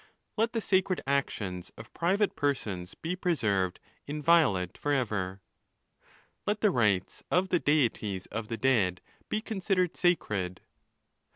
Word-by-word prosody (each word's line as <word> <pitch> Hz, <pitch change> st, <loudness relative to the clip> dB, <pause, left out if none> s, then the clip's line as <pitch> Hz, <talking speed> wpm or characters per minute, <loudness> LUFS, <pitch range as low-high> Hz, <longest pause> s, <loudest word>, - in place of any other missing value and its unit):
Let 230 Hz, +1 st, +1 dB
the 225 Hz, -, 0 dB
sacred 190 Hz, -2 st, +2 dB
actions 105 Hz, -10 st, -2 dB
of 115 Hz, -, -11 dB
private 195 Hz, +4 st, +1 dB
per 145 Hz, -1 st, +2 dB
sons 90 Hz, -7 st, -6 dB
be 170 Hz, +3 st, -3 dB
preserved 105 Hz, -, 0 dB, 0.3 s
inviolate 145 Hz, -, +3 dB
for 145 Hz, -, -2 dB
ever. 100 Hz, -8 st, -1 dB, 1.1 s
Let 210 Hz, 0 st, 0 dB
the 210 Hz, -, +4 dB
rights 105 Hz, -7 st, +1 dB
of 185 Hz, +2 st, +2 dB
the 175 Hz, -, +3 dB
Deities 115 Hz, -, +1 dB
of 110 Hz, +1 st, -4 dB
the 115 Hz, 0 st, -3 dB
dead 105 Hz, -8 st, +2 dB, 0.3 s
be 215 Hz, -, 0 dB
considered 190 Hz, -5 st, 0 dB
sacred. 100 Hz, -, 0 dB
140 Hz, 130 wpm, -29 LUFS, -, 1.1 s, the